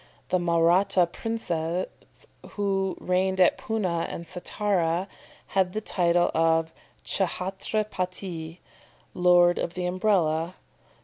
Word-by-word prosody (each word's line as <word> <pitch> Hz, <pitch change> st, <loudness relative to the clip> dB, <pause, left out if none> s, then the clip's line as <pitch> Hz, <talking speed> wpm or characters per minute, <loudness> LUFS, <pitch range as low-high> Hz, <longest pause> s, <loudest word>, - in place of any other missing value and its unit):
The 185 Hz, -, +2 dB
Mahratta 175 Hz, +2 st, +3 dB
princes, 175 Hz, -4 st, -2 dB, 0.7 s
who 195 Hz, -2 st, -1 dB
reigned 190 Hz, +1 st, 0 dB
at 180 Hz, -, +4 dB
Poonah 185 Hz, -7 st, -1 dB
and 170 Hz, -, -6 dB
Sattara, 180 Hz, 0 st, -1 dB, 0.4 s
had 185 Hz, -2 st, 0 dB
the 215 Hz, -, -1 dB
title 175 Hz, -4 st, +2 dB
of 165 Hz, 0 st, +2 dB, 0.3 s
Ch'hatra 190 Hz, +3 st, -1 dB
pati, 180 Hz, -4 st, -5 dB, 0.5 s
"Lord 175 Hz, -1 st, +4 dB
of 170 Hz, -, -3 dB
the 180 Hz, -1 st, -2 dB
Umbrella." 180 Hz, -3 st, +1 dB
180 Hz, 105 wpm, -26 LUFS, 170-190 Hz, 0.7 s, at